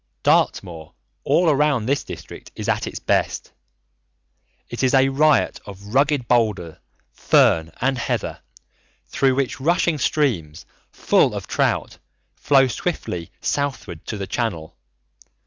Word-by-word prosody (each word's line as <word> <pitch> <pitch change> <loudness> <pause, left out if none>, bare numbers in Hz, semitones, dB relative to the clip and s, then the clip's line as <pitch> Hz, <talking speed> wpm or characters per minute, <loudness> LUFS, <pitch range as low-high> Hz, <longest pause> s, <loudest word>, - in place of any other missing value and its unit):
Dartmoor 80 -3 0 0.3
all 180 - +2
around 145 -5 +1
this 140 +3 0
district - - -10
is - - -6
at - - 0
its - - -6
best. - - -1 1.2
It 120 - -6
is 130 0 +2
a 135 0 +4
riot 145 0 +2
of 100 +1 -10
rugged 140 -2 +2
boulder, 105 -9 0 0.3
fern, 80 0 +2
and 135 0 0
heather, 115 - -3 0.7
through 135 -1 +2
which 135 -1 -2
rushing 170 0 +1
streams, 95 - -1 0.3
full - - +2
of - - -5
trout, - - -1 0.4
flow 135 -2 +4
swiftly 115 - -4
southward 115 - -3
to 105 - -4
the 100 - -4
Channel. 95 -9 -3
125 Hz, 125 wpm, -21 LUFS, 100-140 Hz, 1.2 s, a